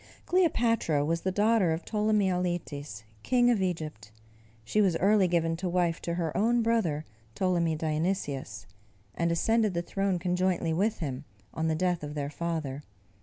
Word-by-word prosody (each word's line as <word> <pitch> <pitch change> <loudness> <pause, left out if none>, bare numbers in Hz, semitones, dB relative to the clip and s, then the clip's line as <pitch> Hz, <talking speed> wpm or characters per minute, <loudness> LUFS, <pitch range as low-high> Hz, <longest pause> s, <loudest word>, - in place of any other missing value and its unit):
Cleopatra 230 - +2
was 165 +2 0
the 190 - -1
daughter 210 -2 +3
of 160 - -5
Ptolemy 210 -2 +1
Auletes, 160 - -3 0.2
king 245 - +3
of 220 -5 +1
Egypt. 155 - -4 0.5
She 210 - +2
was 185 -5 +2
early 200 +1 +4
given 165 -1 +1
to 180 +1 -3
wife 175 -2 0
to 170 - -3
her 165 -3 -2
own 235 +3 +2
brother, 185 -10 0 0.3
Ptolemy 170 -3 +1
Dionysius, 155 - -2 0.5
and 170 +7 0
ascended 215 +3 +2
the 170 - -1
throne 195 0 -1
conjointly 180 -1 0
with 200 +4 0
him, 140 -2 -4 0.3
on 160 0 -1
the 160 - +1
death 180 +1 0
of 150 0 -6
their 145 -1 -3
father. 155 -4 -3
175 Hz, 160 wpm, -29 LUFS, 160-200 Hz, 0.5 s, early